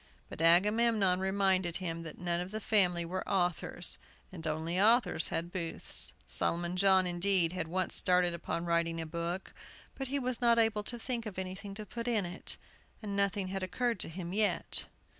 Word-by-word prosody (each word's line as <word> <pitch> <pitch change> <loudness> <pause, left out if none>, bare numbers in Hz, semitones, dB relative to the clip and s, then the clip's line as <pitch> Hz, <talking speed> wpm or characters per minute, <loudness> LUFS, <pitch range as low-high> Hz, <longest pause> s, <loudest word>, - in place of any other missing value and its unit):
But - - -7
Agamemnon 195 +2 +4
reminded 190 -2 +1
him 165 -3 -4
that 165 -2 -8
none 175 -1 -1
of 180 +1 -4
the 215 +2 -4
family 180 -6 +2
were 185 +3 -3
authors, 175 -6 -1 0.3
and 165 -3 -7
only 160 +4 -1
authors 225 -6 +4
had 170 +1 -3
booths. 170 -3 +2
Solomon 175 +1 -1
John, 190 0 +5
indeed, 175 -1 +2
had 185 -3 -3
once 185 +2 -1
started 180 -1 +2
upon 170 0 -4
writing 170 -1 0
a 165 - -3
book, 170 +3 -4 0.4
but 270 - -5
he 280 +3 -1
was 255 -3 -2
not 235 -1 +4
able 225 -2 +3
to 240 - -4
think 235 -1 -3
of 200 - -8
anything 190 +2 -6
to 215 +1 -7
put 235 +4 -6
in 220 -5 +1
it, 175 +1 -5 0.5
and 200 -1 -4
nothing 200 -1 0
had 195 0 -3
occurred 230 +3 -1
to - - -4
him 175 +1 -6
yet. 210 0 0
185 Hz, 180 wpm, -32 LUFS, 170-210 Hz, 0.5 s, John